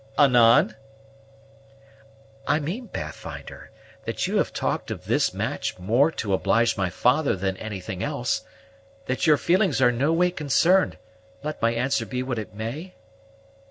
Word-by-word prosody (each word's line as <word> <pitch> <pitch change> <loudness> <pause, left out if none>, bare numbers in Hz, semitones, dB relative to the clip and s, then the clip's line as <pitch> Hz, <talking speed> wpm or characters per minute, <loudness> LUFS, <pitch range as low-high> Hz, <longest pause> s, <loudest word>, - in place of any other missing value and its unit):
"Anan?" 120 -5 +5 1.7
"I 150 - +3
mean, 190 - -4
Pathfinder, 75 - -8 0.4
that - - -2
you - - 0
have - - +1
talked - - -2
of - - -6
this - - +2
match - - -3
more 115 - +3
to 100 -3 -2
oblige 115 +5 +2
my 95 -2 -1
father 135 - +2
than 95 0 -2
anything 95 -4 -6
else; - - -1 0.6
that 130 +5 -1
your 150 -1 +6
feelings 185 -2 +2
are 125 -2 +5
no 135 +6 +1
way 175 +2 +2
concerned, 175 +4 +2 0.5
let 150 0 -5
my 115 - +3
answer 120 +4 0
be 125 -1 -3
what 125 -3 -3
it 110 - -7
may?" 130 - -6
125 Hz, 145 wpm, -24 LUFS, 110-155 Hz, 1.7 s, your